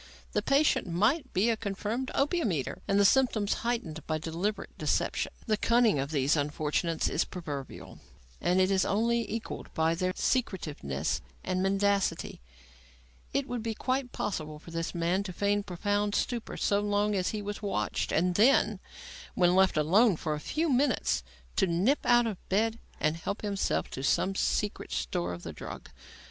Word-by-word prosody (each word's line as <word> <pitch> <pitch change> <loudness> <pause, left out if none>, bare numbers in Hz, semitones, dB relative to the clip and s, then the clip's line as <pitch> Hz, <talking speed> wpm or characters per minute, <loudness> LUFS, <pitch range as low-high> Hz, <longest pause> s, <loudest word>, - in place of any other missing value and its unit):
The - - +1
patient 280 -5 +2
might 225 - +1
be 205 +5 +2
a - - +1
confirmed 215 +4 -3
opium 295 - +1
eater, 145 -6 -3
and 200 - +3
the 200 - +5
symptoms 220 -3 +3
heightened 205 -10 -2
by 155 - 0
deliberate 170 +7 -3
deception. - - 0
The 215 -2 +1
cunning 230 - +3
of 135 +1 -2
these 145 -1 +2
unfortunates 150 +3 0
is - - +1
proverbial 145 -7 -7 0.4
and 180 +1 +2
is 190 0 +3
only 230 +2 +1
equalled 225 0 -5
by 160 +1 +2
their 185 +2 0
secretiveness 155 - -1 0.2
and 185 0 -1
mendacity. 195 - 0 0.9
It 275 0 0
would 245 -3 -3
be 225 0 -3
quite 255 +1 -1
possible 155 -6 -3
for 165 +2 -13
this 165 0 -3
man 175 +3 +1
to 195 -2 -6
feign 205 +2 +1
profound 205 +2 -1
stupor 235 -2 -2
so 200 - +2
long 205 0 +1
as 185 -2 0
he 210 -1 -4
was 205 +1 -5
watched, 195 - -1
and 180 +2 +2
then, 215 -1 +4 0.6
when 175 -1 +4
left 190 -3 +4
alone 190 +8 +4
for 155 0 -2
a 150 - -3
few 315 - -1
minutes, 260 - +2 0.4
to 190 - +4
nip 190 - +2
out 240 -1 +5
of 215 -5 -3
bed 225 +4 +1 0.2
and 155 +1 +1
help 200 +6 -4
himself 200 -2 -1
from 130 - -6
some 185 +7 +2
secret 205 - -1
store 65 +8 -2
of 85 0 -7
the 80 - -6
drug. - - -9
200 Hz, 165 wpm, -29 LUFS, 165-225 Hz, 0.9 s, the